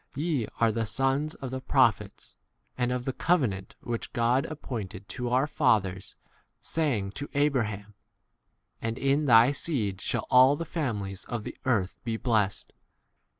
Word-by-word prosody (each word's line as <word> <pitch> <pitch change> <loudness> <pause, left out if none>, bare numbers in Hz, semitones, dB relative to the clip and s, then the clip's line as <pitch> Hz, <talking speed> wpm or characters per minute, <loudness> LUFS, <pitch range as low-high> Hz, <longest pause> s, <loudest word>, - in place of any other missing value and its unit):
Ye 145 -6 -1
are 115 -1 +4
the 110 0 -2
sons 135 +5 0
of 135 -2 -7
the 130 0 -4
prophets, 115 -7 +1 0.4
and 125 -1 0
of 125 0 -2
the 135 - -2
Covenant 120 - 0
which 120 -1 -4
God 120 +3 +2
made 120 - -6 0.2
with 120 0 -2
our 130 +3 +3
fathers, 105 -11 0 0.4
saying 145 -11 0
unto 135 +9 -6
Abraham, 110 -8 0 0.9
'and 115 +1 -2
in 140 +3 +1
thy 115 +1 +7
seed 110 - -2
shall - - -1
all 130 +3 +7
the 165 - -4
kindreds 105 - -3
of 120 -3 -4
the - - -7
earth 105 -8 0
be 115 -1 -2
blessed. 110 -5 0
125 Hz, 150 wpm, -28 LUFS, 105-140 Hz, 0.9 s, thy